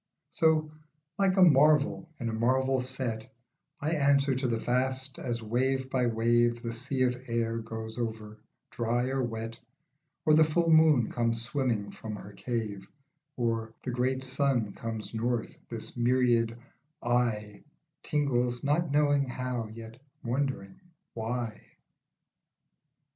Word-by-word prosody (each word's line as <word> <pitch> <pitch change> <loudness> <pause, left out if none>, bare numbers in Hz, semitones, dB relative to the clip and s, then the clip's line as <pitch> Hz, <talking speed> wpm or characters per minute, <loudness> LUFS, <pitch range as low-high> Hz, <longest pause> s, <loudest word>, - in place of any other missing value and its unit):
So, 155 -1 +2 0.5
like 195 -1 +3
a 190 - +8
marvel 150 0 +4
in 120 - -3
a 115 - -2
marvel 130 +3 +2
set, 125 -2 -3 0.5
I 150 +3 -1
answer 140 -3 +3
to 130 0 -1
the 115 -1 0
vast, 130 +2 -1
as 120 -2 -3
wave 130 +4 0
by 125 -2 +2
wave 120 +1 +2
The 115 -1 -3
sea 130 +2 -1
of 125 -1 +2
air 115 -1 -1
goes 110 0 -6
over, 110 -2 -4 0.3
dry 120 +2 0
or 135 0 0
wet, 115 -1 -4 0.7
Or 155 - +5
the 160 +1 +7
full 165 +2 +2
moon 155 -7 +5
comes 115 -1 0
swimming 120 -5 -1
from 110 -2 -7
her 100 0 -10
cave, 105 -5 -4 0.3
\ - - -52
Or 115 -2 -1
the 130 - -2
great 130 +2 0
sun 130 -5 0
comes 115 -1 -5
north, 115 0 -1
this 115 -2 -7
myriad 120 -2 +2 0.5
I 115 -4 0 0.4
Tingles, 125 -5 0
not 150 +4 +1
knowing 145 -1 +3
how, 125 -2 -3
yet 115 +2 -11 0.2
wondering 125 -5 -2 0.3
why. 115 -1 -3
120 Hz, 135 wpm, -29 LUFS, 115-135 Hz, 0.7 s, a